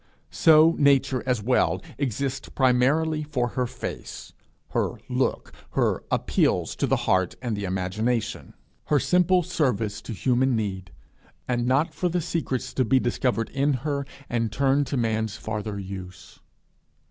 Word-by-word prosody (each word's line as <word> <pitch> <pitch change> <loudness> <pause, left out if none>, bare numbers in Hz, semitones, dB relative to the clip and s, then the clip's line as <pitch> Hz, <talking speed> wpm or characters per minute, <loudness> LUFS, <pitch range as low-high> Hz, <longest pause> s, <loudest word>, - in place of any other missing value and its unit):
So 160 +1 +6
Nature 135 -2 +3
as 125 -5 0
well 125 +3 +2 0.2
exists 135 0 -2
primarily 140 +5 +2
for 130 -5 -1
her 125 +1 -1
face, - - -7 0.4
her - - 0
look, - - -1 0.2
her - - +1
appeals - - +1
to - - 0
the - - +3
heart 95 -1 +2
and 120 -4 -2
the 100 -1 -3
imagination, 95 +6 -2 0.3
her 150 - +3
simple 180 +3 +3
service 125 - -1
to 115 - -6
human 130 +4 +1
need, 95 -4 -3 0.6
and 120 -1 0
not 135 +5 +2
for 180 - -1
the 175 +1 0
secrets 160 -6 -3
to 130 - +2
be 130 +3 +3
discovered 120 -1 -1
in 140 +1 +1
her 140 -2 -1 0.2
and 115 -2 -1
turned 135 +3 +2
to 135 - -2
man's 110 -2 -1
farther 105 -1 -4
use. 95 -2 -9
125 Hz, 145 wpm, -25 LUFS, 110-140 Hz, 0.6 s, So